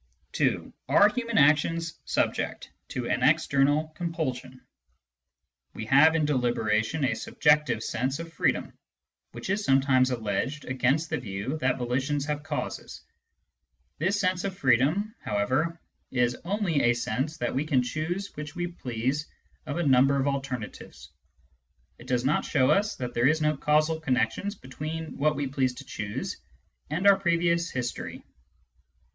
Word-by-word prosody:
(2) - - 0 0.2
Are 205 - +6
human 235 0 -2
actions 155 +3 +3
subject - - -1 0.2
to 125 -2 -4
an 125 - 0
external 145 +1 +3
compulsion? 155 -7 -4 1.2
We - - -5
have, 140 +7 +6
in 155 -2 +2
deliberation, 120 0 +1
a 130 - +1
subjective 150 -2 +2
sense 130 +4 -1
of 165 0 -8
freedom, - - 0 0.6
which - - -5
is 205 +1 0
sometimes 135 -3 +3
alleged 125 +5 -2
against 135 +5 0
the - - 0
view 100 +6 -4
that 130 -2 +1
volitions 130 +4 -1
have 150 -1 -2
causes. - - -5 1.0
This 190 +6 +1
sense 185 -2 0
of 195 -2 -4
freedom, 140 - +2
however, 130 +11 -1 0.3
is 125 -1 +1
only 185 -6 0
a 120 - +4
sense 130 +6 -2
that 120 - -2
we 135 - 0
can 140 -5 +2
choose 160 +10 -3
which 150 +2 -7
we 175 0 -2
please 135 -3 -3 0.4
of 145 - -3
a 175 - 0
number 135 0 +4
of 135 - +1
alternatives: 135 -5 -5 0.9
it - - -13
does 125 0 0
not 145 - +2
show 130 -3 +2
us 210 +1 +2
that 125 -1 -5
there 120 +2 +3
is 155 +2 +3
no 150 0 +1
causal 155 +3 +2
connection 160 +7 0
between 155 +5 -6
what 150 +1 +2
we 145 0 -2
please 130 -2 0
to 140 - -10
choose 105 -6 -4 0.5
and 165 +6 -2
our 200 -1 +7
previous 170 -2 +1
history. 125 -2 -5
145 Hz, 145 wpm, -27 LUFS, 130-165 Hz, 1.2 s, our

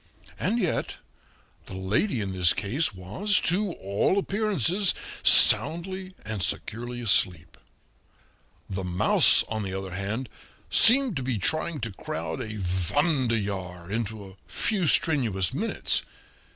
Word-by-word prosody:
And 230 - -1
yet 185 -8 -2 0.7
the 95 - -9
lady 105 - -1
in 100 -1 -4
this 90 -2 +2
case 110 +11 -2
was 105 - 0
to 190 +1 0
all 100 - -1
appearances 200 -2 0 0.3
soundly 185 +3 +6
and 110 -2 -5
securely 120 +7 -4
asleep; 90 -6 +1 1.1
the 95 0 -5
mouse, 90 0 +4
on 110 -1 -4
the 95 -2 -5
other 95 -1 -7
hand, 100 +7 -5 0.4
seemed 250 -2 +5
to - - -3
be 125 -2 -3
trying 155 - -2
to 115 -1 -4
crowd 155 +4 -6
a 115 - -5 0.4
wanderjahr 105 - -2
into 110 -2 -5
a 95 0 -17
few 195 -7 -1
strenuous 115 - +1
minutes. - - -2
115 Hz, 125 wpm, -25 LUFS, -, 1.1 s, soundly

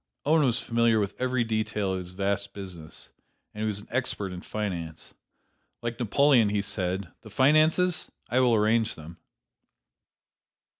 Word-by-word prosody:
Owen 155 +2 +4
was 125 -2 +2
familiar 115 -2 +2
with 100 -1 -1
every 130 -1 +1
detail 110 -3 -1
of 95 - -2
his 90 -1 -7
vast 100 +2 -2
business, 90 -6 -9 0.4
and 105 - -7
he 110 - 0
was 105 -1 -1
an - - -16
expert 105 -6 -2
in 90 - -7
finance. 90 -8 -5 0.7
Like 115 0 -4
Napoleon 125 -1 +4
he 100 -1 0
said: 95 -3 -3
"The - - -12
finances? 155 +6 +3 0.2
I 125 +3 +1
will 125 -3 +4
arrange 110 +1 +2
them." 80 +1 -11
105 Hz, 150 wpm, -27 LUFS, 95-120 Hz, 0.7 s, Owen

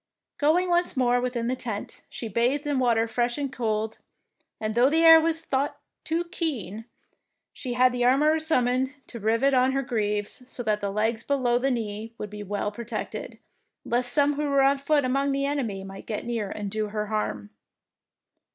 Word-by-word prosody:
Going 320 +5 +3
once 345 -4 +1
more 245 -1 +3
within 245 -2 -2
the 250 +2 0
tent, 225 -5 -6
she 230 - -6
bathed 245 +7 0
in 290 -2 0
water 230 -3 +3
fresh 240 +1 -1
and 280 -2 -3
cold, 220 -2 -2 0.6
and 215 0 -2
though 245 +4 +4
the 325 +2 +3
air 325 0 +10
was 325 0 0
a - - -21
thought 275 +2 -1 0.2
too 330 +2 0
keen, 245 - -3 0.7
she 250 -3 -5
had 250 +1 +4
the 245 0 -1
armourer 295 +6 +4
summoned 260 -3 +1
to 235 - -8
rivet 230 +6 +2
on 255 +1 +3
her 275 0 0
greaves, 210 -2 -2
so 250 - -5
that 215 -2 0
the 200 - -1
legs 220 +3 0
below 250 -4 +1
the 270 +2 +1
knee 225 -2 -4
should 210 - -5
be 210 0 -7
well 205 +1 -2
pro 235 +3 -8
tected, 225 -1 -5 0.5
lest 245 +1 0
some 290 +2 +3
who 295 0 -2
were 280 -1 +4
on 275 +1 +3
foot 285 0 +2
among 275 +2 +1
the 275 0 0
enemy 245 -9 -2
might 195 0 -10
get 215 - -4
near 230 -4 -2
and 205 -1 -5
do 215 0 -1
her 210 0 -3
harm. 110 - -3
245 Hz, 195 wpm, -26 LUFS, 215-275 Hz, 0.7 s, air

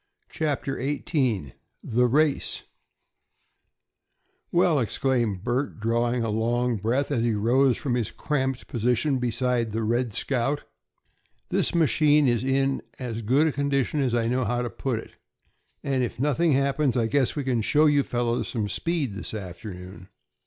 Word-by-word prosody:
CHAPTER 145 -4 -2
XVIII 130 - -1 0.3
THE 125 +2 +2
RACE 145 +3 +1 1.9
"Well," 175 -4 +3
exclaimed 115 -5 0
Bert, 125 +2 -2
drawing 120 +2 0
a 115 - -1
long 120 +2 0
breath 120 +8 0
as 125 -5 +1
he 115 -2 +1
rose 125 +5 +3
from 130 - -2
his 120 -4 0
cramped 130 -3 -2
position 125 +4 +1
beside 120 -2 0
the 115 0 -1
"Red 120 +2 0
Scout," 135 +6 -1 0.9
"this - - +1
machine 150 -1 +4
is 120 -1 +1
in 135 0 +1 0.2
as 115 -3 -4
good 140 +7 +2
condition 140 0 0
as 130 -4 +1
I 115 -1 +1
know 125 +2 +1
how 120 +2 -1
to 120 - -4
put 130 -4 -2
it, 115 - -10 0.7
and 135 -2 0
if 120 - -4
nothing 150 +3 +2
happens 140 0 +1
I 115 - +2
guess 135 +2 +1
we 145 - -2
can 125 -3 0
show 150 +8 +3
you 145 -2 +4
fellows 120 -2 -1
some 110 -4 -2
speed 160 -7 -1
this 100 +2 -5
afternoon." 90 -1 -8
125 Hz, 150 wpm, -25 LUFS, 115-140 Hz, 1.9 s, machine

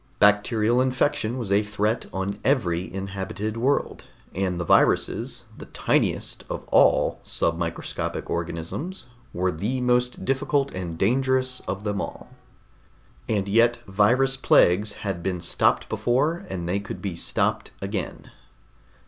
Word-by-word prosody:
Bacterial 105 +3 +3
infection 130 -2 0
was 115 -6 -4
a 100 +1 +4
threat 105 +2 -1
on 95 +2 -3
every 95 -10 +1
inhabited 95 +2 -4
world, 130 +5 0 0.3
and 90 -2 -1
the - - -1
viruses - - +2
the - - -11
tiniest - - 0
of - - -5
all - - +4
submicroscopic 85 0 -2
organisms 130 - -4 0.3
were 90 +1 0
the 105 +11 -2
most 125 0 +1
difficult 135 +1 0
and 85 -3 -5
dangerous 130 +4 +1
of 100 +2 -3
them 105 -1 -1
all. - - -7 1.0
And 100 -3 0
yet 115 +3 +4
virus 120 +7 +3
plagues 105 -4 +4
had 95 -4 -2
been 90 0 -2
stopped 85 - +1
before, 145 +8 0
and 85 -3 -4
they 95 +3 0
could 100 - -7
be 95 -4 -4
stopped - - 0
again. 95 -1 -5
105 Hz, 130 wpm, -25 LUFS, 95-125 Hz, 1.0 s, a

